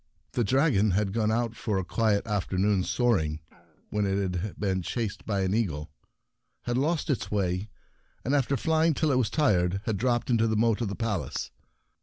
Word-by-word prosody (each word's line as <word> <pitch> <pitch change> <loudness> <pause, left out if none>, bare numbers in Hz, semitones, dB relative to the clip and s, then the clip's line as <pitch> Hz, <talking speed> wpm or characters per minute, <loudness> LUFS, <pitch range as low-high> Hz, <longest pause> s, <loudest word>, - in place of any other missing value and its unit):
The 120 - 0
dragon 125 -3 +3
had 100 -2 0
gone 110 -1 +1
out 115 0 0
for 105 -3 -2
a 95 - -1
quiet 110 0 +1
after 100 -3 -2
noon's 95 -1 +2
soaring, 85 -12 +1 0.5
when 105 -1 0
it 95 -1 0
had 100 +4 -5
been 95 -2 0
chased 110 +3 -4
by 100 -3 0
an 95 0 0
eagle, 80 -10 -1 0.7
had 120 - -1
lost 155 +4 +1
its 135 - -2
way, 95 0 -1 0.6
and, 135 - 0
after 140 -1 +2
flying 160 +1 +2
till 155 0 +1
it 130 - +3
was 115 -5 +1
tired, 95 - +2
had 110 -3 0
dropped 120 +3 0
into 115 -1 +3
the 110 -1 0
moat 115 0 +2
of 115 - 0
the 100 - -4
Palace. 105 - -3
110 Hz, 190 wpm, -28 LUFS, 95-120 Hz, 0.7 s, dragon